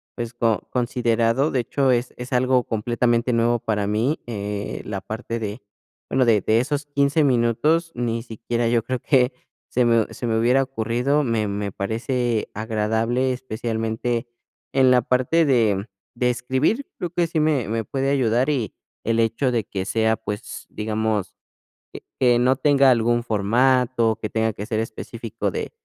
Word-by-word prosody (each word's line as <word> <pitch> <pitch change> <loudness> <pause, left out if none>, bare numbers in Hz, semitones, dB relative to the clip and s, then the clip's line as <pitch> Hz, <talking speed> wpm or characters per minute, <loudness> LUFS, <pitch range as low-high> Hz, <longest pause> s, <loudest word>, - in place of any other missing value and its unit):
pues, 120 -1 -5
co 115 -3 0
considerado. 120 +2 +1
De 130 - +1
hecho, 135 +2 +1
es 120 +1 0
es 125 +2 -7
algo 125 0 +3
completamente 120 +2 0
nuevo 115 0 +2
para 105 -2 -1
mí, 115 +9 0
eh, 105 -2 -4
la 100 -2 -4
parte 115 +1 -5
de 110 +2 -5 0.5
bueno, 130 -1 +2
de 110 -4 +4
de 110 +3 +2
esos 145 +2 -2
15 145 +2 +2
minutos, 140 +7 +2
ni 115 -1 -2
siquiera 115 0 -2
yo 115 -2 +2
creo 130 +1 -2
que 125 -1 +2 0.4
se 125 - +2
me 115 -2 +3
se - - -6
me 110 -1 +1
hubiera 125 +4 +3
ocurrido. 130 +3 0
Me 115 -4 0
me 100 0 -3
parece 115 +2 -1
agradable, 110 +4 0
especialmente 115 0 -3 0.5
en 130 -1 +5
la 125 - +5
parte 130 +7 +2
de, 115 -7 +3
mm, - - -5 0.3
de 125 +1 +1
escribir, 130 - 0
creo 175 - -3
que 175 -1 +1
sí 160 -1 -1
me 145 -8 +1
me 115 0 -1
puede 135 +3 -1
ayudar, 125 0 +2
y 125 -8 -1 0.3
el 115 0 +1
hecho 115 +4 +1
de 115 - +1
que 95 -2 -4
sea, 110 +1 +1
pues, 105 +2 -6
digamos, 110 -2 -2 0.6
e - - -11 0.2
que 120 -2 +4
no 130 +2 +3
tenga 140 -2 +5
algún 120 0 +2
formato, 115 +1 +2
que 110 - -3
tenga 110 0 0
que 100 - -6
ser 110 0 -2
específico 115 0 -4
de - - -4
120 Hz, 165 wpm, -23 LUFS, 110-130 Hz, 0.6 s, en